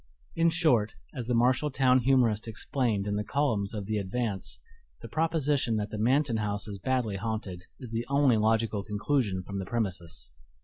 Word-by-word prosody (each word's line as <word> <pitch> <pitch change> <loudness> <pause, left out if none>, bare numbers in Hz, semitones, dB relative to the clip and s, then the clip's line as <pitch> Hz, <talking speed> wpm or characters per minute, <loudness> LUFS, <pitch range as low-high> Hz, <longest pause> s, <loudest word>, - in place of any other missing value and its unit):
In 165 0 +4
short, 135 -10 +2 0.2
as 125 -5 -5
the 125 - +1
Marshall 130 +5 +3
town 130 -2 +3
humorist 120 -4 +2
explained 115 -2 -1
in 105 0 -1
the 105 - -1
columns 115 -7 0
of 105 -2 -4
the 105 +1 -1
Advance, 100 0 -3 0.5
"the - - -6
proposition 150 -7 +1
that 105 -1 -2
the 105 - -4
Manton 125 +1 +2
house 105 -1 -2
is 100 -2 -6
badly 120 -3 -1
haunted 100 -4 -4
is 125 -4 -9
the 115 +1 -3
only 140 -4 +4
logical 110 -1 +1
conclusion 105 -2 -1
from 100 +1 -5
the 95 - -4
premises." 90 - -4
115 Hz, 175 wpm, -29 LUFS, 105-130 Hz, 0.5 s, In